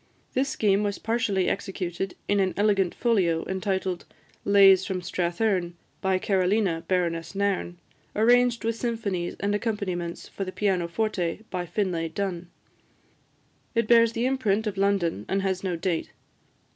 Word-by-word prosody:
This 270 +2 +1
scheme 200 -4 +2
was 205 -2 -1
partially 215 -5 0
executed 190 -1 -3
in 205 0 +2
an 190 -1 +1
elegant 200 -3 +2
folio, 185 -9 +1
entitled 190 -1 -2 0.4
"Lays 195 -2 +6
from 190 -1 -2
Strathearn: 175 0 -1 0.3
by 190 -1 +2
Carolina, 185 -2 +1
Baroness 170 -1 -1
Nairn. 195 -3 -1 0.4
Arranged 240 +2 +4
with 230 0 0
Symphonies 220 -7 -2
and 205 +1 0
Accompaniments 200 -6 -3
for 195 - -5
the 185 - -5
Pianoforte, 185 0 -1
by 180 -1 -3
Finlay 175 -3 -1
Dun." 180 -1 -4 1.3
It 230 -1 +2
bears 230 -1 +5
the 230 +1 -1
imprint 225 -5 +1
of 210 -2 -2
London, 195 - +1
and 195 0 0
has 190 -1 -1
no 185 -2 -1
date. 170 -1 -2
195 Hz, 135 wpm, -26 LUFS, 180-210 Hz, 1.3 s, Lays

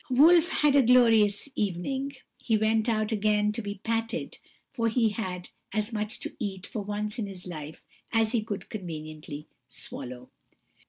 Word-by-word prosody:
"Wolf 325 +7 +6
had 295 -5 +3
a 280 - +8
glorious 230 -4 +5
evening; 265 +9 -2 0.3
he 225 -3 +2
went 220 +1 +2
about 215 -2 +1
again 210 -1 +2
to 225 +2 -3
be 205 -2 -6
patted, 225 +1 -2 0.4
and 230 -1 +1
he 230 -2 +4
had 185 -4 -4 0.2
as 215 +2 -1
much 215 +2 -2
to - - -5
eat, 190 -1 -4
for 220 - -4
once 210 +2 -3
in 210 - -1
his 190 -2 -7
life, 155 -3 -8 0.3
as 225 -1 +3
he 235 -3 +2
could 210 -3 -5
conveniently 155 -5 -7 0.2
swallow. 125 0 -7
215 Hz, 160 wpm, -28 LUFS, 195-230 Hz, 0.4 s, a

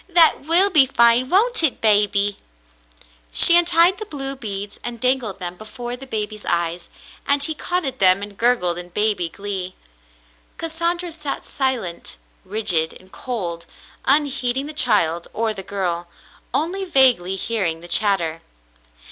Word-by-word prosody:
That 340 -2 +4
will 365 +5 +4
be 290 -6 +5
fine, 235 0 +3
won't 450 +6 +2
it, 315 -5 0
baby? 205 -1 +2 0.5
" - - -27
She 340 - +7
untied 345 +2 +4
the 430 - -6
blue 275 -5 -5
beads 205 -4 -7
and 240 -1 -6
dangled 250 -5 0
them 180 -2 -6
before 240 +3 -7
the 270 +2 -10
baby's 215 -2 -4
eyes, 170 0 -2 0.4
and 280 0 +2
he 315 - -2
caught 355 +3 -2
at 260 -1 -4
them 185 +1 +4
and 205 0 -8
gurgled 195 -7 +1
in 175 0 -9
baby 205 -3 +1
glee. 190 0 -5 0.8
Cassandra 340 +2 -2
sat 305 -3 -5
silent, 235 - -3 0.3
rigid, 185 -6 +1
and 185 0 -21
cold, 175 -9 -5 0.4
unheeding 275 -2 +1
the 305 - -7
child 170 - +1
or 225 -1 -1
the 195 - -6
girl, 180 -3 -4 0.4
only 365 +5 -2
vaguely 255 - +3
hearing 190 -6 -2
the 175 - -11
chatter. 175 -5 0
225 Hz, 150 wpm, -20 LUFS, 185-280 Hz, 0.8 s, She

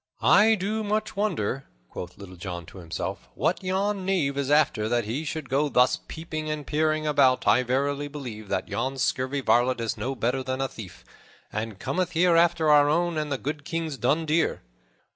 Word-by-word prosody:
"I 205 - +6
do 215 +3 -2
much 215 +1 -1
wonder," 150 - -1 0.2
quoth 90 +7 -8
Little 95 -2 -10
John 85 -1 -6
to 95 - -12
himself, 85 -2 -5
"what - - 0
yon 195 +1 0
knave 175 -8 0
is 140 -1 -2
after, 135 -8 +3
that 120 -2 +1
he 120 +9 -3
should 155 -1 -4
go 140 +3 +1
thus 125 -1 +3
peeping 155 -1 -5
and 150 -1 -3
peering 155 +1 0
about 140 -4 +3
I 125 - +5
verily 140 +3 -1
believe 125 -8 -7
that - - -1
yon 130 +3 -2
scurvy 130 +2 0
varlet 125 0 +3
is 115 -1 -2
no 130 +6 -3
better 125 +2 0
than 130 0 -3
a 135 - 0
thief, 90 - -11 0.5
and 110 -1 -4
cometh 175 - -2
here 175 +1 +4
after 165 -2 +4
our 145 -1 +6
own 170 +2 +1
and 150 -1 -2
the 135 - 0
good 145 +3 -4
King's 165 -1 -3
dun 145 +7 +1
deer." 160 +1 +1
145 Hz, 190 wpm, -26 LUFS, 125-160 Hz, 0.5 s, I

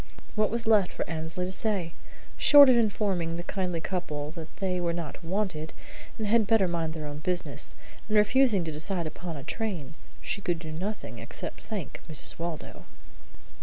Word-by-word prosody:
What 215 -1 +2
was 230 +1 -1
left 215 -4 +4
for - - -3
Annesley 160 +2 -3
to 185 - -3
say? 190 -5 0 0.4
Short 285 -2 +9
of - - +5
informing 195 -7 +1
the 175 - -4
kindly 180 -2 -2
couple 155 -5 -3
that 160 -1 -9
they 185 -2 0
were 170 -1 0
not 170 0 -5
wanted 170 -3 -2 0.4
and 220 - -2
had 220 0 +4
better 210 -3 +4
mind 165 -2 -2
their 155 -1 -5
own 145 0 -5
business, 175 -4 -1 0.3
and 215 0 +2
refusing 210 -2 +4
to 160 - -3
decide 170 +3 +1
upon 160 +1 -5
a 140 - -7
train, 180 - -3 0.3
she 200 - -3
could 175 -3 0
do 160 -1 -7
nothing 195 +7 -4
except - - -6
thank 210 -4 -5
Mrs. 155 +1 -2
Waldo. 170 -2 -5
180 Hz, 175 wpm, -28 LUFS, 160-210 Hz, 0.4 s, Short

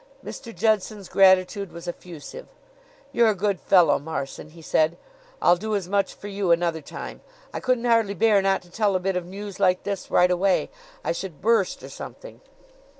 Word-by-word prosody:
Mr. 235 - -8
Judson's 210 0 0
gratitude 190 0 +3
was 170 0 -10
effusive. 175 - -8 0.6
"You're 235 -1 +4
a 215 - +1
good 200 -1 -1
fellow, 170 -6 +4
Marson," 145 -1 -6
he 165 +2 -15
said. 155 +1 +1 0.4
"I'll 175 - +4
do 215 +3 -2
as 195 -4 -2
much 200 +1 0
for 205 - -9
you 200 -2 -2
another 170 -1 +1
time. - - -8 0.3
I - - -3
couldn't 250 -2 0
hardly 225 -4 +2
bear 210 +1 +4
not 195 -1 +1
to 175 - -20
tell 210 -2 +1
a - - +2
bit 190 +1 -1
of 180 -1 -3
news 200 +1 -8
like 185 -2 +2
this 200 -2 -4
right 180 0 +4
away. 185 +1 +1 0.3
I - - 0
should 170 -2 -5
burst 220 -3 +1
or - - -8
something." - - -10
195 Hz, 185 wpm, -24 LUFS, 175-205 Hz, 0.6 s, You're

